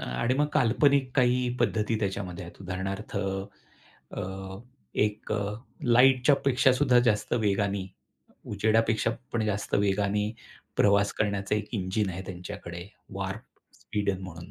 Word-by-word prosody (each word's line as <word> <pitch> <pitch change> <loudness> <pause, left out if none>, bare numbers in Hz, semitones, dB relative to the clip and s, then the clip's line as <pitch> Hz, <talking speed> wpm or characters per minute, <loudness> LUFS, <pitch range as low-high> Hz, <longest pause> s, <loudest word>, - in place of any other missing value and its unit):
आणि 90 - -1
मग 145 +2 +2
काल्पनिक 135 +3 +3
काही 125 -1 +3
पद्धती 110 0 +1
त्याच्यामध्ये 95 -3 -3
आहेत. 85 - -13
उदाहरणार्थ 95 +3 -4
अ, 95 0 -4 1.3
एक 105 0 0
अ, 105 -1 -1 0.3
लाईटच्या 125 +3 +5
पेक्षा 135 -1 +4
सुद्धा 125 -1 +4
जास्त 110 -4 +1
वेगाने, 100 -3 0 0.7
उजेडापेक्षा 110 +2 +2 0.2
पण 115 -2 0
जास्त 105 -1 -1
वेगाने 100 +1 +1 0.5
प्रवास 100 0 +4
करण्याचा 100 -1 -1
एक 105 -1 -2
इंजिन 95 0 0
आहे 95 +1 -5
त्यांच्याकडे 90 -2 -7 0.3
वार्प - - -4 0.4
स्पीडन 100 -2 -2
म्हणून. 85 -2 -9
105 Hz, 120 wpm, -28 LUFS, 95-115 Hz, 1.3 s, लाईटच्या